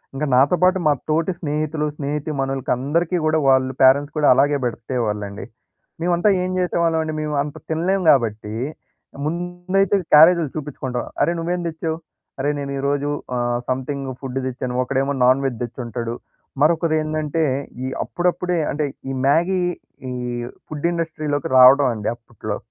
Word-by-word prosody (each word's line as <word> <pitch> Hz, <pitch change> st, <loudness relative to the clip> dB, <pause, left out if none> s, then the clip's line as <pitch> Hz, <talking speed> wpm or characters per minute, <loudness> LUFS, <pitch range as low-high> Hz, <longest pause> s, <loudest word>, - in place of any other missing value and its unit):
ఇంక 145 Hz, -, -3 dB
నాతో 140 Hz, +7 st, +5 dB
పాటు 185 Hz, +1 st, +5 dB
మా 150 Hz, -, +5 dB, 0.2 s
తోటి 165 Hz, +4 st, +1 dB
స్నేహితులు, 150 Hz, 0 st, -2 dB
స్నేహితీమనులకి 140 Hz, -2 st, -2 dB
అందరికి 165 Hz, +7 st, 0 dB
గూడా 155 Hz, 0 st, +2 dB
వాళ్ళు 130 Hz, 0 st, +3 dB
పేరెంట్స్ 140 Hz, +3 st, +5 dB
కూడా 150 Hz, -, +3 dB
అలాగే 145 Hz, +3 st, +3 dB
బెడితేవాళ్ళండి. 110 Hz, -4 st, -3 dB, 0.6 s
మేమంతా 175 Hz, +3 st, +2 dB
ఏం 185 Hz, -, -2 dB
జేసేవాళ్ళమండి, 165 Hz, -3 st, 0 dB
మేము 150 Hz, -1 st, -2 dB
అంత 150 Hz, 0 st, -7 dB
తినలేము 180 Hz, +4 st, 0 dB
గాబట్టి, 110 Hz, -5 st, +2 dB, 0.7 s
ముందైతే 175 Hz, +4 st, 0 dB, 0.2 s
క్యారేజ్‌లు 165 Hz, 0 st, +7 dB
చూపిచ్చుకుంటాం. 130 Hz, -4 st, -4 dB, 0.2 s
అరె, 170 Hz, -, +3 dB
నువ్వేం 175 Hz, +2 st, -2 dB
దెచ్చావు? 160 Hz, 0 st, -3 dB, 0.4 s
"అరె 145 Hz, +2 st, +1 dB
నేను 140 Hz, 0 st, -4 dB
ఈ -, -, -3 dB
రోజు 145 Hz, 0 st, 0 dB, 0.3 s
ఆహ్, 120 Hz, 0 st, 0 dB
సమ్‌థింగ్ 135 Hz, +2 st, -2 dB
ఫుడ్డు 135 Hz, -1 st, -3 dB
దెచ్చాను" 125 Hz, 0 st, -3 dB
ఒకడేమో 135 Hz, +2 st, -1 dB
నాన్‌వెజ్ 130 Hz, -1 st, +2 dB
దెచ్చుంటాడు. 120 Hz, -1 st, -5 dB, 0.5 s
మరొకరేందంటే, 155 Hz, -1 st, +1 dB, 0.4 s
ఈ -, -, -2 dB, 0.2 s
అప్పుడప్పుడే 180 Hz, 0 st, -1 dB
అంటే 150 Hz, +1 st, -1 dB, 0.2 s
ఈ -, -, -2 dB
మ్యాగీ 175 Hz, +5 st, +2 dB, 0.5 s
ఈ -, -, -3 dB, 0.5 s
ఫుడ్ 155 Hz, +2 st, -2 dB
ఇండస్ట్రీ‌లోకి 155 Hz, -4 st, -2 dB
రావడమండి 125 Hz, -4 st, +6 dB
అప్పుట్లో. 110 Hz, -3 st, -6 dB
145 Hz, 130 wpm, -21 LUFS, 130-165 Hz, 0.7 s, క్యారేజ్‌లు